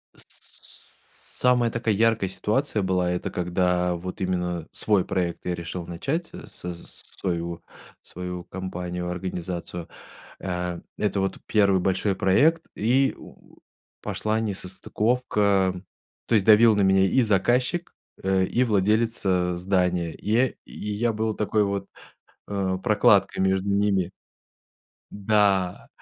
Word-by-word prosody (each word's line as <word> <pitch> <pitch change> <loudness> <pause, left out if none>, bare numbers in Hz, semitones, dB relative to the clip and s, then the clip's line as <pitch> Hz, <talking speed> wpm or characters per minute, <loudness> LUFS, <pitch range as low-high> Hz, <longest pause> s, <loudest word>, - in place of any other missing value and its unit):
Самая 125 -2 -3
такая 115 -2 0
яркая 110 -3 +2
ситуация 110 +3 -1
была, 90 -1 +1
это 90 - -3
когда 90 0 0
вот 90 +2 -7
именно 90 -3 -2
свой 105 -4 +1
проект 90 -2 -2
я 90 - -1
решил 85 +1 -6
начать, 140 - -3 0.2
со 90 0 -6
своего 85 0 -5 0.4
свою 90 0 -7
компанию, 90 -1 -5
организацию. 90 -1 -5 0.5
Э, 90 -2 -3 0.2
это 105 -1 0
вот 95 0 -2
1 100 -3 +3
большой 95 +1 0
проект, 150 - +3
и 130 +5 +2
у - - -16 0.4
пошла 110 +1 -1
несостыковка, 100 -1 0 0.4
то 115 - +1
есть 100 -3 +3
давил 110 0 +7
на 105 - +2
меня 95 0 +4
и 130 +7 +3
заказчик, 120 - +1 0.3
э, 95 0 +2
и 125 - +1
владелец, 110 +2 +1
э, 90 -2 +1
здания. 90 -2 0
И 105 - -8
я 125 +4 +4 0.2
и 105 - -6
я 115 +3 0
был 110 +1 -1
такой 105 0 +1
вот, 100 -1 -2 0.6
э, 95 -2 -1
прокладкой 100 -2 +3
между 95 +1 +1
ними. 100 -3 +1 1.0
Да, 100 -3 +1
95 Hz, 120 wpm, -25 LUFS, 90-110 Hz, 1.0 s, давил